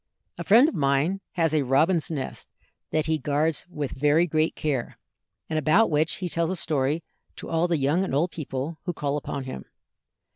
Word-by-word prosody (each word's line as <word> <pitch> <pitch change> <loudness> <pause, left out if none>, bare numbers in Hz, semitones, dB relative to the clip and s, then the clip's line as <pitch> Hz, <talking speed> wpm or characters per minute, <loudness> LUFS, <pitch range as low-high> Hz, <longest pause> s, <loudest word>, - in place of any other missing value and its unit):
A - - -3
friend 225 - +6
of - - -2
mine 150 +4 +1
has 165 -3 +1
a 155 - +3
robin's 155 +6 +2
nest 145 -5 -5 0.4
that 155 0 0
he 160 -1 0
guards 150 +3 0
with 150 -5 -4
very 150 +5 +3
great 155 -1 0
care, 140 -6 -2 0.5
and 155 -1 -1
about 160 +9 +3
which 155 +2 +2
he 185 - -3
tells 170 -1 0
a 185 - -1
story 155 -1 -1 0.3
to - - -9
all 165 +1 +2
the 170 -2 +1
young 145 +6 +1
and 185 - -2
old 170 +5 +1
people 150 +1 -5
who 175 - -2
call 145 -2 -2
upon 140 -1 -4
him. 130 - -7
155 Hz, 190 wpm, -25 LUFS, 140-170 Hz, 0.5 s, friend